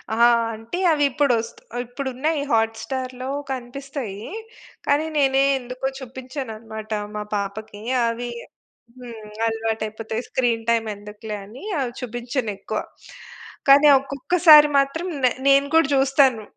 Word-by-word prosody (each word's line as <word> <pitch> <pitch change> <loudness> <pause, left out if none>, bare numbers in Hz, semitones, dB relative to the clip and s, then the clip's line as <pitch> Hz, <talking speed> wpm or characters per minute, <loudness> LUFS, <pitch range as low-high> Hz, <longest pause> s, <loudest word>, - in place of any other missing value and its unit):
ఆ! - - -5 0.4
అంటే 225 +10 -6
అవిప్పుడొస్త్ 280 -6 +1 0.3
ఇప్పుడున్నాయి 270 +4 -2
హాట్‌‌స్టార్‌లో 250 +3 -1 0.2
కనిపిస్తాయి. 250 -4 -6 0.6
కానీ, 290 +2 +2
నేనే 270 -1 +4 0.2
ఎందుకో 255 +2 -4
చూపించననమాట 235 -4 -7 0.2
మా 210 - -3
పాపకి. 205 +1 -5 0.2
అవీ 235 +1 -2 0.7
హ్మ్. 230 -3 -10 0.2
అలవాటయిపోతాయి. 225 0 -3
స్క్రీన్ 235 -3 0
టైమ్ 225 -1 +2
ఎందుకులే 210 +1 -8
అని 235 - -12 0.2
అవి 250 -3 -1
చూబించనెక్కువ. 240 -3 -3 0.9
కానీ 285 +2 +8
ఒక్కొక్కసారి 300 +3 +6
మాత్రం 320 +6 -1 0.2
నే 245 - +4 0.2
నేను 275 +1 +5
గూడా 325 -4 +5
జూస్తాను. 265 -5 +3
245 Hz, 100 wpm, -23 LUFS, 225-275 Hz, 0.9 s, కానీ